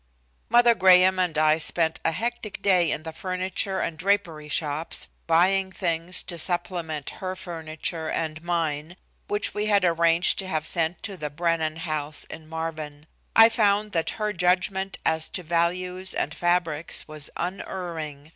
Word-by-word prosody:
Mother 240 Hz, +1 st, +6 dB
Graham 185 Hz, -2 st, +5 dB
and 180 Hz, -4 st, 0 dB
I 155 Hz, 0 st, +4 dB
spent 160 Hz, +1 st, +2 dB
a 165 Hz, -, +2 dB
hectic 230 Hz, +2 st, -4 dB
day 180 Hz, -4 st, +4 dB
in 155 Hz, -, -2 dB
the 160 Hz, -, -6 dB
furniture 185 Hz, +2 st, -2 dB
and 160 Hz, -, -3 dB
drapery 175 Hz, -6 st, 0 dB
shops, 150 Hz, +1 st, -1 dB, 0.2 s
buying 190 Hz, +3 st, +3 dB
things 175 Hz, -1 st, -1 dB
to 170 Hz, -, -4 dB
supplement 170 Hz, -4 st, -2 dB
her 185 Hz, 0 st, -3 dB
furniture 160 Hz, -2 st, -4 dB
and 160 Hz, -1 st, -3 dB
mine, 165 Hz, -1 st, -2 dB, 0.3 s
which 205 Hz, -, 0 dB
we 210 Hz, 0 st, -1 dB
had 200 Hz, -3 st, +3 dB
arranged 170 Hz, 0 st, +3 dB
to 190 Hz, -, -2 dB
have 155 Hz, -4 st, -2 dB
sent 165 Hz, +1 st, 0 dB
to 200 Hz, -3 st, -3 dB
the 150 Hz, -3 st, -4 dB
Brennan 160 Hz, 0 st, -1 dB
house 155 Hz, -2 st, -1 dB
in 160 Hz, -1 st, -9 dB
Marvin. 155 Hz, -2 st, -5 dB, 0.3 s
I 225 Hz, 0 st, +9 dB
found 210 Hz, -2 st, +2 dB
that 165 Hz, -3 st, 0 dB
her 210 Hz, -1 st, -1 dB
judgment 190 Hz, +2 st, +1 dB
as 160 Hz, 0 st, +2 dB
to 180 Hz, -, -4 dB
values 180 Hz, +3 st, -1 dB
and -, -, -2 dB
fabrics 175 Hz, -2 st, 0 dB
was 155 Hz, -1 st, -7 dB
unerring. 165 Hz, -5 st, -5 dB
170 Hz, 155 wpm, -25 LUFS, 160-185 Hz, 0.3 s, I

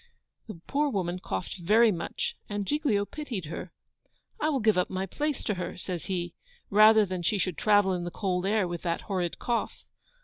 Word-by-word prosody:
The 215 Hz, -7 st, -8 dB
poor 290 Hz, +1 st, +1 dB
woman 185 Hz, -6 st, -2 dB
coughed 180 Hz, 0 st, -4 dB
very 215 Hz, +6 st, +5 dB
much, 170 Hz, -, -3 dB
and 205 Hz, -1 st, -2 dB
Giglio 275 Hz, -7 st, +1 dB
pitied 245 Hz, -, -5 dB
her. 165 Hz, +3 st, -6 dB, 0.7 s
'I 305 Hz, -, +1 dB
will 280 Hz, -3 st, +1 dB
give 215 Hz, -2 st, +3 dB
up 180 Hz, 0 st, +1 dB
my 190 Hz, 0 st, -2 dB
place 295 Hz, -, -2 dB
to 210 Hz, -, 0 dB
her,' 180 Hz, -1 st, -5 dB
says 180 Hz, -1 st, -5 dB
he, 175 Hz, -3 st, -3 dB, 0.4 s
'rather 215 Hz, +1 st, +7 dB
than 185 Hz, -2 st, -4 dB
she 190 Hz, +5 st, +1 dB
should 185 Hz, -2 st, -1 dB
travel 205 Hz, -1 st, +4 dB
in 175 Hz, -1 st, -2 dB
the 175 Hz, -, -3 dB
cold 180 Hz, 0 st, -1 dB
air 210 Hz, -2 st, +2 dB
with 175 Hz, -1 st, -5 dB
that 170 Hz, -1 st, -1 dB
horrid 180 Hz, -4 st, -2 dB
cough. 240 Hz, -2 st, -2 dB
195 Hz, 195 wpm, -28 LUFS, 180-220 Hz, 0.7 s, rather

